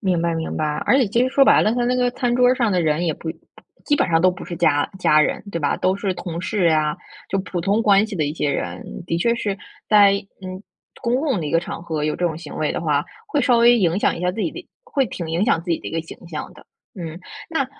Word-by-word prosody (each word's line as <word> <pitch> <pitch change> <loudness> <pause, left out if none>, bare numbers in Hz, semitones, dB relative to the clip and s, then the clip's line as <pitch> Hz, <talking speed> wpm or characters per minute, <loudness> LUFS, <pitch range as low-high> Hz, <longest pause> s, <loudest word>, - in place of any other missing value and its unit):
明 185 -5 +1
白， 170 0 0
明 160 0 -3
白， 155 - 0 0.2
而 265 - +5
且 255 - +3
其 235 +4 +1
实 255 - +2
说 275 +1 +4
白 - - +5
了， 215 - +2
他 245 0 0
那 250 +1 +1
个 250 -1 +2
餐 245 0 -1
桌 250 0 +4
儿 250 - +5
上 240 -4 +1
的 180 -3 +1
人 160 +2 +1
也 160 - 0
不 160 - -6
不 - - -16 0.2
基 290 - +2
本 - - +1
上 165 -1 +3
都 185 +2 +5
不 180 - -8
是 175 - -6
家 150 -4 +2
家 155 -4 +4
人， - - 0
对 170 - -3
吧， 145 - 0
都 185 +1 +1
是 200 -2 -1
同 170 -2 -5
事 185 0 0
呀， 155 -2 +1 0.3
就 195 - -1
普 185 -2 -4
通 200 +6 +1
关 205 -1 +4
系 220 - -7
的 160 -5 0
一 145 +1 -3
些 150 -3 0
人， - - -5
的 165 - -1
确 235 +7 +2
是 205 -4 -2 0.3
在， 205 -2 +6 0.3
嗯， 185 +1 -7 0.4
公 240 0 +1
共 270 - 0
的 155 - -3
一 - - -3
个 165 - +3
场 170 0 -6
合 160 -3 -3
有 150 - 0
这 180 - 0
种 160 -2 -3
行 160 -2 -9
为 155 - 0
的 - - -3
话， 150 -3 +1 0.2
会 305 -9 0
稍 250 -2 +3
微 240 +1 +6
影 175 -3 +2
响 - - +1
一 - - -7
下 180 0 +1
自 195 - -5
己 180 - 0
的 355 - -10 0.2
会 285 - 0
挺 175 -5 -6
影 170 +5 +1
响 190 - +2
自 175 - -6
己 165 - +1
的 - - -7
一 - - -8
个 165 - -1
形 165 - -11
象 155 -3 -6
的， - - -17 0.3
嗯。 165 -3 -7 0.3
那 295 -5 0
185 Hz, 305 characters per minute, -21 LUFS, 165-235 Hz, 0.4 s, 在